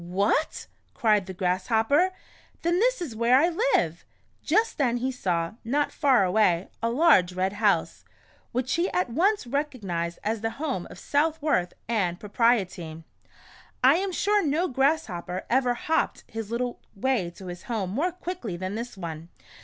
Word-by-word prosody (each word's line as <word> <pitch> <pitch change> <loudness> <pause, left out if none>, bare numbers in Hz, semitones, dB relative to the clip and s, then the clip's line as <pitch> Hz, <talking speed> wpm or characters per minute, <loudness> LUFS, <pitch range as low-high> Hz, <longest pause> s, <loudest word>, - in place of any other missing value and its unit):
"What!" 200 - 0 0.3
cried 210 -4 +2
the 190 - -6
Grasshopper, 220 - +2 0.5
"then 345 +2 +2
this - - +2
is 260 -10 -6
where 235 +3 +4
I 325 +6 +4 0.3
live." - - 0 0.4
Just 450 -4 +1
then 245 -4 +2
he 260 +2 -1
saw, 175 -9 -1
not 285 +6 0
far 265 -9 +3
away, 185 -2 +2
a 230 - +1
large 235 - +4
red 185 +2 -1
house, 205 -1 +1 0.5
which 250 +1 -1
he 345 +3 +1
at 360 -9 0
once 390 - +2
recognized 210 - -3
as 220 +1 -1
the 225 - 0
home 270 - -3
of - - -11
Southworth 295 - 0
and 190 -6 0
Propriety. 195 -7 0 0.8
I 270 +5 +7
am 385 +1 -1
sure 410 +3 +2
no 320 +4 +1
grasshopper 245 - -1
ever 250 -1 +3
hopped 320 +6 -1
his 225 -2 -6
little 240 +1 -2 0.2
way 210 -4 0
to 190 - -11
his 175 -1 -7
home 215 -6 -2
more 315 - 0
quickly 350 - -5
than 185 +2 -4
this 235 0 -5
one. 165 -2 -7
235 Hz, 155 wpm, -26 LUFS, 190-295 Hz, 0.8 s, I